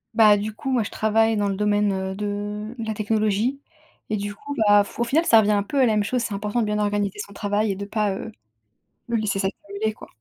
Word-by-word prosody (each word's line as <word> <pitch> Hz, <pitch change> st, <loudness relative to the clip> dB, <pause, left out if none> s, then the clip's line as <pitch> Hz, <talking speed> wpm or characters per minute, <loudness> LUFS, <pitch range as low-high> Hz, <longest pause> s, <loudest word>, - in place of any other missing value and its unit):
Bah, 210 Hz, -2 st, +7 dB
du 210 Hz, +1 st, -4 dB
coup, 265 Hz, -, -4 dB
moi, 245 Hz, -3 st, +2 dB
je 205 Hz, -, -3 dB
travaille 220 Hz, 0 st, +2 dB
dans 205 Hz, -1 st, +1 dB
le 195 Hz, -, -1 dB
domaine, 205 Hz, 0 st, +2 dB
heu, 190 Hz, 0 st, -3 dB
de 210 Hz, +2 st, -4 dB
la 220 Hz, -1 st, -3 dB
technologie, 215 Hz, +5 st, 0 dB, 0.5 s
et 215 Hz, -, 0 dB
du 205 Hz, +1 st, -4 dB
coup, 285 Hz, +6 st, -7 dB
bah, 205 Hz, 0 st, +6 dB
f -, -, -12 dB
au -, -, +3 dB
final, 295 Hz, +8 st, +2 dB
ça 225 Hz, -8 st, +6 dB
revient 210 Hz, 0 st, +3 dB
un 205 Hz, -1 st, +3 dB
peu 275 Hz, +8 st, -4 dB
à 260 Hz, -, +6 dB
la 220 Hz, -, +2 dB
même 210 Hz, -1 st, +2 dB
chose. 250 Hz, +3 st, -1 dB
C'est 215 Hz, -, -3 dB
important 210 Hz, +4 st, -1 dB
de -, -, +1 dB
bien 210 Hz, 0 st, -1 dB
organiser 205 Hz, -1 st, -1 dB
son 200 Hz, -, -6 dB
travail 205 Hz, +1 st, 0 dB
et -, -, -2 dB
de 200 Hz, +1 st, -5 dB
pas, 210 Hz, -1 st, 0 dB
heu, 220 Hz, -, -6 dB, 0.8 s
le 235 Hz, -, -1 dB
laisser 205 Hz, -2 st, -1 dB
s'accumuler, 200 Hz, +2 st, -3 dB
quoi. -, -, -13 dB
210 Hz, 255 wpm, -23 LUFS, 205-220 Hz, 0.8 s, Bah